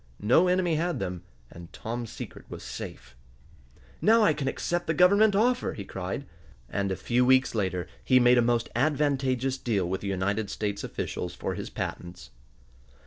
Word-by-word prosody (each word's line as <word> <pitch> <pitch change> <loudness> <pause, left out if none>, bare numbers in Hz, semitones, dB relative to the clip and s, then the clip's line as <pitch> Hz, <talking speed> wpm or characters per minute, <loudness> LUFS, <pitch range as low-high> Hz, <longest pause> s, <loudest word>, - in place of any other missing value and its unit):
No 145 - +5
enemy 180 -3 +2
had 170 -1 -1
them, 90 -6 -4 0.3
and 85 -1 -11
Tom's 115 0 -5
secret - - -9
was - - -8
safe. - - -8 0.9
"Now 225 +1 +5
I 160 - +5
can 145 -3 -3
accept 175 +5 -2
the 160 - +1
Government 200 +5 +5
offer!" 245 +4 +2
he 100 - -7
cried. 95 -1 -5 0.4
And 100 +8 -2
a - - 0
few 120 +6 +1
weeks 130 +1 +4
later 95 -5 -1 0.2
he 130 -1 +5
made 125 0 +5
a - - +5
most 120 -1 +1
advantageous 135 -2 +1
deal 100 -8 0
with 95 +2 -3
the 100 - -5
United 100 +2 -1
States 100 -1 -3
officials - - -4
for - - -3
his - - -6
patents. 90 -6 -6
125 Hz, 170 wpm, -27 LUFS, 100-155 Hz, 0.9 s, No